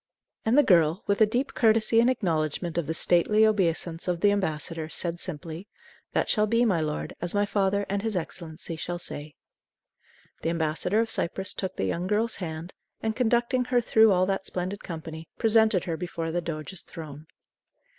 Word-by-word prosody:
And 225 +5 +3
the 295 - +7
girl, 170 - +3
with 200 +1 0
a 215 - +7
deep 245 +6 -1
courtesy 225 0 +4
in 235 +2 +5
acknowledgment 170 - -1
of 160 - -3
the 160 - -1
stately 210 +7 +4
obeisance 175 -5 0
of 175 -1 -1
the 205 - +5
ambassador, 160 -4 -2
said 170 +1 -3
simply, 165 +2 -5 0.5
"That - - +1
shall 215 -1 +2
be, 230 +3 +3
my 190 -7 +2
lord, 150 -1 -3
as 175 +3 0
my 205 0 +3
father 200 0 0
and 200 +1 -1
his 220 -1 -2
Excellency 165 -1 -5
shall 175 +2 -4
say." 150 -4 -6 1.1
The 165 - -1
ambassador 170 +5 0
of 225 -1 -3
Cyprus 190 0 -1
took 190 -1 -4
the - - -1
young 170 - -2
girl's 220 +3 0
hand, 165 -1 -6 0.3
and, 220 0 -1
conducting 245 +1 +1
her 250 0 +2
through 220 -2 +5
all 185 -1 +3
that 195 0 -2
splendid 185 +3 -3
company, 160 -1 -7
presented 220 -4 +4
her 165 -2 -3
before 165 -1 -4
the 175 +1 -1
doge's 165 +2 -4
throne. 155 -2 -10
180 Hz, 180 wpm, -27 LUFS, 165-215 Hz, 1.1 s, the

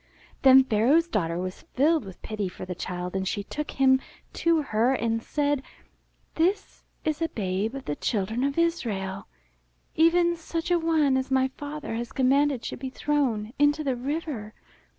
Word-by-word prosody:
Then 265 0 +8
Pharaoh's 260 +8 +3
daughter 170 - -1
was 185 +1 -5
filled 300 -1 +1
with 190 -2 -12
pity 210 -3 -3
for 180 - -8
the 180 - -4
child, 180 +1 -5
and 190 0 -1
she 205 +1 -2
took 300 +8 -5
him 265 -1 +3 0.3
to 330 -2 +2
her 240 +1 +2
and 225 -2 -1
said, 290 +1 0 0.7
This 375 +5 0 0.2
is 310 0 -1
a 330 - +1
babe 200 +3 -2
of 270 - -7
the 145 - -2
Children 220 - -1
of 280 +2 -1
Israel, 220 - -1 0.7
even 340 +2 +4
such 330 +1 -4
a 350 - +4
one 315 -5 +2
as 260 0 -2
my 265 0 +2
father 290 0 -6
has 235 +1 -4
commanded 275 0 +2
should - - -5
be 265 0 -4
thrown 255 -6 -1
into 290 +1 +3
the 270 -3 0
river." 260 -4 -4
265 Hz, 170 wpm, -26 LUFS, 215-305 Hz, 0.7 s, Then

